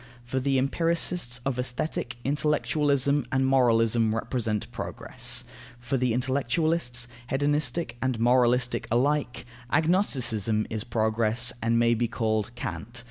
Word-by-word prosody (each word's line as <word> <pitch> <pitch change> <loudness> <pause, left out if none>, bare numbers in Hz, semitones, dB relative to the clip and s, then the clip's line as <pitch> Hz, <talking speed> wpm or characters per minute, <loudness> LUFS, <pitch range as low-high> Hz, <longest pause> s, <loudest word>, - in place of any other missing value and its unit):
For 130 +2 -2
the 135 +1 +1
empiricists 165 -2 0
of 130 -2 -1
Aesthetic, 125 0 -3
intellectualism 145 -1 +1
and 130 0 +2
moralism 115 -4 +3
represent 115 -2 -2
progress; - - -2 0.3
for 120 +2 -3
the 125 -2 +1
intellectualists, 130 0 0 0.2
hedonistic 145 -1 0
and 130 -3 -1
moralistic 125 0 +2
alike, 130 +1 0 0.3
agnosticism 130 - +1
is 110 -1 -2
progress 115 +1 +1
and 115 +1 +1
may 120 0 +4
be 120 +1 0
called 110 -1 -1
Kant. 105 +4 -5
125 Hz, 115 wpm, -26 LUFS, 115-140 Hz, 0.3 s, may